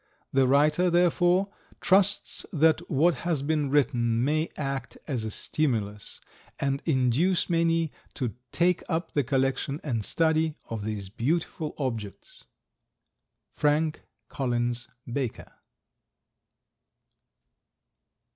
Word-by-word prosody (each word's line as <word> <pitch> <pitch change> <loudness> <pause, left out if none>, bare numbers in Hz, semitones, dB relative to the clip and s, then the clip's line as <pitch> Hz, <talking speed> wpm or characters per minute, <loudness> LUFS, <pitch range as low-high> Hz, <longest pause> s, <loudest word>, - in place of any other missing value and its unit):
The 135 -1 +4
writer, 150 +6 +4
therefore, 175 +2 +3 0.3
trusts 195 +1 +2
that 160 +1 +2
what 165 +4 +3
has 165 -6 -1
been 150 -1 0
written 120 -4 +2
may 155 +3 +1
act 135 -3 -4
as 130 -7 -2
a 110 - -3
stimulus 105 -5 -1 0.4
and 140 0 0
induce 155 +7 +2
many 165 -1 +2 0.2
to 125 -5 -2 0.2
take 175 0 +2
up 165 0 -1
the 145 - +1
collection 135 +2 0
and 115 -7 -2
study 160 +3 +1
of 110 -2 -5
these 105 -3 -4
beautiful 150 - -2
objects. 115 -8 -5 1.1
Frank 150 +1 +1 0.3
Collins 120 -2 -1 0.2
Baker. 125 -1 -4
145 Hz, 100 wpm, -27 LUFS, 125-165 Hz, 1.1 s, The